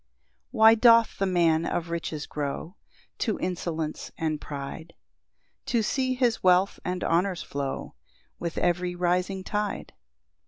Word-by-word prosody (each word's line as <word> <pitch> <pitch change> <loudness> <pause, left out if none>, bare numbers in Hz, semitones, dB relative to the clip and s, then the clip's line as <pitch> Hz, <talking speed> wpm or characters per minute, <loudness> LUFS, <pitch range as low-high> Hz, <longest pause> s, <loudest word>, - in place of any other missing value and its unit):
1 - - -8
Why 220 0 +9
doth 230 0 +5
the 195 - +1
man 170 -3 +3
of 170 0 -2
riches 160 -3 -3
grow 150 +5 -4 0.4
To 220 - 0
insolence 165 -4 -3
and 155 -2 -2
pride, 145 +3 -7 0.7
To 235 -3 +1
see 260 +3 0
his 245 -3 +1
wealth 185 +1 +3
and 180 0 -3
honours 180 +2 +1
flow 140 -1 -4 0.5
With 170 -1 -4
every 175 0 0
rising 180 +2 0
tide? 210 +1 -3
180 Hz, 130 wpm, -27 LUFS, 165-205 Hz, 0.7 s, Why